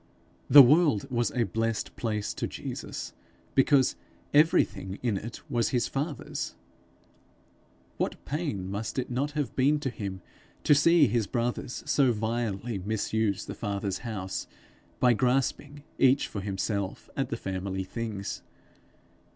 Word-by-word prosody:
The 145 Hz, -1 st, +11 dB
world 145 Hz, -, +4 dB
was 120 Hz, -1 st, +1 dB
a 120 Hz, -, 0 dB
blessed 115 Hz, +1 st, -2 dB
place 105 Hz, -3 st, -2 dB
to -, -, -3 dB
Jesus, -, -, -6 dB, 0.4 s
because 135 Hz, -1 st, +4 dB, 0.4 s
everything 105 Hz, -, +3 dB
in 115 Hz, -5 st, +1 dB
it 115 Hz, +4 st, -6 dB
was 120 Hz, -5 st, +1 dB
his 125 Hz, -3 st, +1 dB
father's. 145 Hz, -, -4 dB, 1.4 s
What -, -, -3 dB
pain 140 Hz, -, -3 dB
must 105 Hz, +5 st, -4 dB
it 125 Hz, -1 st, -2 dB
not 140 Hz, +4 st, -1 dB
have 145 Hz, -5 st, -2 dB
been 145 Hz, +3 st, +3 dB
to 135 Hz, -, -2 dB
him, 100 Hz, -4 st, -6 dB, 0.4 s
to -, -, +6 dB
see 160 Hz, +2 st, +6 dB
his 115 Hz, -3 st, +1 dB
brothers 120 Hz, +2 st, -2 dB
so 135 Hz, -4 st, +3 dB
vilely 110 Hz, -1 st, -2 dB
misuse 105 Hz, 0 st, -1 dB
the -, -, -6 dB
Father's 100 Hz, -2 st, -3 dB
house 100 Hz, -6 st, -4 dB, 0.5 s
by 125 Hz, -1 st, +5 dB
grasping, 135 Hz, +4 st, 0 dB, 0.2 s
each 135 Hz, +1 st, +4 dB
for 100 Hz, -, -5 dB
himself, 100 Hz, 0 st, -3 dB
at -, -, -1 dB
the -, -, -2 dB
family 95 Hz, 0 st, -3 dB
things! 105 Hz, -1 st, -5 dB
115 Hz, 135 wpm, -28 LUFS, 100-135 Hz, 1.4 s, The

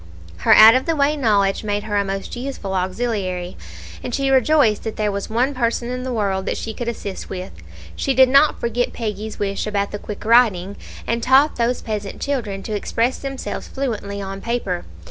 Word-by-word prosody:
Her -, -, +4 dB
out 220 Hz, +1 st, +10 dB
of 260 Hz, +4 st, +1 dB
the 330 Hz, -, +1 dB
way 290 Hz, +1 st, +2 dB
knowledge 205 Hz, -8 st, +1 dB
made 205 Hz, -1 st, -2 dB
her 210 Hz, -1 st, -3 dB
a 200 Hz, -, +3 dB
most 195 Hz, 0 st, -4 dB
useful 245 Hz, -6 st, -5 dB
auxiliary, 185 Hz, -2 st, -2 dB, 0.5 s
and 245 Hz, -, -3 dB
she 275 Hz, -1 st, 0 dB
rejoiced 260 Hz, -4 st, +3 dB
that 220 Hz, -, -4 dB
there 210 Hz, -1 st, 0 dB
was 200 Hz, 0 st, -4 dB
one 245 Hz, +5 st, +1 dB
person 235 Hz, -1 st, -1 dB
in 250 Hz, 0 st, -3 dB
the 255 Hz, 0 st, -4 dB
world 195 Hz, -4 st, -1 dB
that -, -, -1 dB
she 220 Hz, -, -5 dB
could 240 Hz, +2 st, -5 dB
assist 205 Hz, -4 st, -5 dB
with 185 Hz, 0 st, -6 dB
it. -, -, -15 dB, 0.3 s
She 270 Hz, -2 st, -1 dB
did 260 Hz, +1 st, +7 dB
not 275 Hz, +4 st, +4 dB
forget 235 Hz, +1 st, -1 dB
Peggy's 215 Hz, -1 st, -5 dB
wish 200 Hz, +1 st, -2 dB
about 200 Hz, -1 st, -1 dB
the 205 Hz, -, -5 dB
quick 210 Hz, 0 st, -8 dB
writing, 210 Hz, -5 st, +3 dB, 0.3 s
and 230 Hz, +1 st, -1 dB
taught 265 Hz, +5 st, +4 dB
those 240 Hz, +1 st, 0 dB
peasant 210 Hz, -3 st, -4 dB
children 225 Hz, -9 st, -3 dB
to 215 Hz, -, -3 dB
express 230 Hz, +4 st, -1 dB
themselves 270 Hz, -1 st, -5 dB
fluently 215 Hz, -7 st, -4 dB
on 195 Hz, 0 st, -6 dB
paper. 230 Hz, -7 st, -2 dB
220 Hz, 200 wpm, -21 LUFS, 200-250 Hz, 0.5 s, out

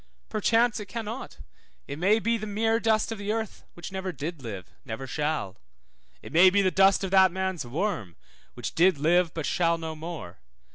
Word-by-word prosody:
Perchance 225 Hz, +2 st, +2 dB
it 210 Hz, -, -7 dB
cannot; 225 Hz, +5 st, -6 dB, 0.5 s
it 140 Hz, +2 st, -6 dB
may 200 Hz, +5 st, +4 dB
be 230 Hz, +1 st, +1 dB
the 215 Hz, -1 st, -4 dB
mere 225 Hz, +2 st, +1 dB
dust 220 Hz, -1 st, +1 dB
of 225 Hz, -, -5 dB
the 205 Hz, +1 st, -2 dB
earth, 220 Hz, -1 st, -4 dB
which 175 Hz, -, -8 dB
never 190 Hz, -1 st, -3 dB
did 155 Hz, +1 st, -6 dB
live, 100 Hz, -7 st, -7 dB
never 110 Hz, +4 st, -6 dB
shall. 150 Hz, -8 st, -2 dB, 0.7 s
It -, -, -10 dB
may 180 Hz, +3 st, +8 dB
be 200 Hz, +2 st, +2 dB
the 185 Hz, -, +2 dB
dust 195 Hz, +2 st, +4 dB
of 190 Hz, -, -3 dB
that 190 Hz, -1 st, +6 dB
man's 190 Hz, -6 st, -3 dB
worm, 140 Hz, -, -2 dB, 0.4 s
which -, -, -5 dB
did 180 Hz, -1 st, +4 dB
live, 170 Hz, +3 st, +3 dB
but 160 Hz, -3 st, -3 dB
shall 170 Hz, -1 st, +1 dB
no 160 Hz, -1 st, -5 dB
more. 155 Hz, -, -8 dB
185 Hz, 190 wpm, -27 LUFS, 155-210 Hz, 0.7 s, may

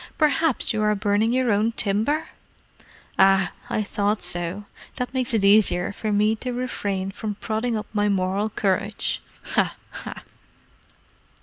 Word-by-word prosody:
Perhaps 310 Hz, -4 st, +2 dB
you 215 Hz, -, 0 dB
are 210 Hz, 0 st, +3 dB
burning 205 Hz, +2 st, +1 dB
your 255 Hz, -1 st, +2 dB
own 215 Hz, +3 st, +2 dB
timber?—ah, 195 Hz, -, 0 dB, 0.2 s
I 215 Hz, -, 0 dB
thought 205 Hz, +1 st, -1 dB
so. 175 Hz, +4 st, -2 dB, 0.3 s
That 250 Hz, -1 st, -3 dB
makes 255 Hz, -1 st, -1 dB
it 220 Hz, -4 st, +1 dB
easier 200 Hz, -3 st, +4 dB
for 215 Hz, +1 st, -3 dB
me 210 Hz, +2 st, +3 dB
to 250 Hz, +3 st, -4 dB
refrain 200 Hz, -6 st, -2 dB
from 210 Hz, +1 st, -4 dB
prodding 220 Hz, +2 st, -1 dB
up 210 Hz, -, -4 dB
my 205 Hz, -1 st, +2 dB
moral 195 Hz, +2 st, 0 dB
courage—ha, 200 Hz, 0 st, -1 dB, 0.2 s
ha!" -, -, -8 dB
210 Hz, 130 wpm, -24 LUFS, 200-230 Hz, 0.3 s, easier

